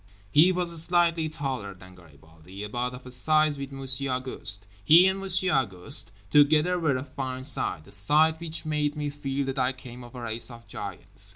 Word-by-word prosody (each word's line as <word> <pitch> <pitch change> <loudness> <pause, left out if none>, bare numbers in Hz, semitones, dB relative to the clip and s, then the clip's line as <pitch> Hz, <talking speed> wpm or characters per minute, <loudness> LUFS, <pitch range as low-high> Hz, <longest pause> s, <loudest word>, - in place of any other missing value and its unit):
He 160 +5 +6
was 175 -3 0
slightly 170 -2 +2
taller 130 -10 -5
than 95 0 -15
Garibaldi, 80 +3 -14
about 120 +4 -3
of 125 - -13
a 125 - -9
size 155 +4 +2
with 140 0 -6
Monsieur 135 0 +1
Auguste. 125 -6 0 0.2
He 165 - +7
and 190 +1 +1
Monsieur 185 -1 +1
Auguste 115 -1 0 0.2
together 155 +5 +4
were 150 -6 +1
a 130 - -5
fine 130 -2 -6
sight, 105 - -1
a - - -13
sight 150 +11 +3
which 165 -1 -4
made 150 -1 -1
me 150 -1 -3
feel 140 -1 -3
that 135 0 -3
I 130 +1 +1
came 125 -1 -11
of 120 +1 -13
a 125 - -7
race 115 +1 -5
of 115 -1 -13
giants. - - -2
135 Hz, 190 wpm, -26 LUFS, 120-155 Hz, 0.2 s, He